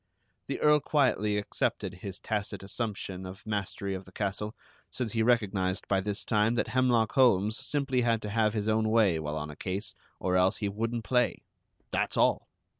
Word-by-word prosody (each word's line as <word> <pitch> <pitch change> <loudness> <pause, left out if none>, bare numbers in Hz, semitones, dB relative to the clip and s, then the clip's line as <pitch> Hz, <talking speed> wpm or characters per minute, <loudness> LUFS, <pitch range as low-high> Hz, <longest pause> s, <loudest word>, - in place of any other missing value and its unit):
The - - -3
Earl 150 0 +5
quietly 125 -9 +2
accepted 100 -2 -2
his 95 +1 -7
tacit 105 -2 -3
assumption 100 -3 -4
of 95 +1 -9
mastery 100 -2 -3
of 95 0 -6
the 95 - -15
castle, 105 +2 -3 0.3
since 125 -4 -3
he 115 - +1
recognized 105 -5 +1
by 95 -1 +2
this 100 +1 -3
time 110 +2 +2
that 120 - 0
Hemlock 120 -2 +2
Holmes 110 -5 +4
simply 135 -2 0
had 115 -2 +2
to 105 - -4
have 110 0 +2
his 105 -1 -1
own 110 0 +2
way 105 -7 +4
while 75 0 -3
on 75 0 -4
a - - -10
case, 95 +5 -3 0.3
or 90 -1 0
else 90 +3 +3
he 105 - -2
wouldn't 115 +3 -2
play, 125 +2 +1 0.5
that's - - 0
all! - - +3
105 Hz, 185 wpm, -29 LUFS, 95-115 Hz, 0.5 s, Earl